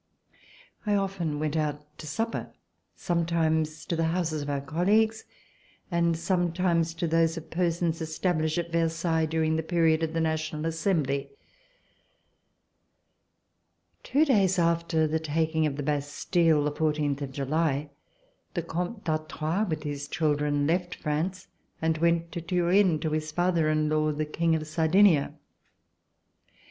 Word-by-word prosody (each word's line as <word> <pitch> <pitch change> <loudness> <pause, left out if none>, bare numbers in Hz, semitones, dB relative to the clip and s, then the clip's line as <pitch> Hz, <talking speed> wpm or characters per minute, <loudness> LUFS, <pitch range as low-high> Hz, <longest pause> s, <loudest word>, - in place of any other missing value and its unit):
I 210 -2 +1
often 190 -6 -1
went 155 0 -2
out 150 -2 -1 0.2
to 155 - -8
supper 225 +9 -3 0.2
— - - -49
sometimes 160 -2 0
to 170 - -2
the 165 0 +1
houses 160 -2 -1
of 145 - -5
our 140 -1 0
colleagues, 210 +10 +1 0.7
and 170 -1 +2
sometimes 170 -1 0
to 170 - -2
those 165 0 +2
of 160 - -9
persons 170 -1 0
established 160 0 -1
at 170 -1 -2
Versailles 165 -1 +1
during 160 0 +1
the - - 0
period 160 -1 +2
of 160 0 -1
the 165 - 0
National 155 -1 -1
Assembly. 160 -4 0 2.7
Two 290 +5 +2
days 195 - +3
after 170 -1 +2
the 155 +1 0
taking 160 0 0
of 140 - -3
the 145 - -4
Bastille, 150 +2 +1
the 150 - 0
fourteenth 150 -2 0
of 140 -2 -4
July, 145 +1 -1 0.6
the 170 - -1
Comte 180 +6 -4
d'Artois, 155 +4 -1
with 155 -1 -3
his 145 -1 -4
children, 145 -2 0
left 175 +3 0
France 175 +5 -3 0.3
and 160 -1 0
went 170 0 +1
to 170 - -4
Turin 180 0 +2
to 155 - -1
his 155 0 -2
father 175 -1 +1
in 155 0 +1
law, 155 0 +1
the 150 +1 -2
King 165 +2 +1
of 155 -1 -3
Sardinia. 160 0 +3
160 Hz, 140 wpm, -27 LUFS, 155-170 Hz, 2.7 s, days